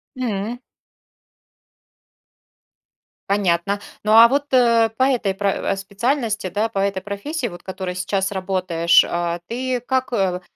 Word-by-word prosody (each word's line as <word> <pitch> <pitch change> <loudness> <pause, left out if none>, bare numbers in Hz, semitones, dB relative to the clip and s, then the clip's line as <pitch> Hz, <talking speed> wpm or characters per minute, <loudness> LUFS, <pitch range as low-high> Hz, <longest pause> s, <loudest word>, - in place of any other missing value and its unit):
М. 235 -1 -3 2.7
Понятно. 200 0 +1 0.2
Ну, 215 - 0
а 230 +1 +9
вот, 280 +4 0
э, 235 -3 +4
по 260 - +3
этой 245 -7 +1
про 200 +1 0 0.2
э, - - 0
специальности, 215 +1 -2
да, 210 +5 -1
по 200 - -3
этой 195 -1 -1
профессии, 240 - -4
вот 175 -5 -10
которой 185 -1 -5
сейчас 190 +2 -1
работаешь, 185 -3 +2
а, 170 0 -2
ты 255 +1 -2
как 260 +1 -2
э, 185 -4 0
200 Hz, 130 wpm, -21 LUFS, 190-240 Hz, 2.7 s, а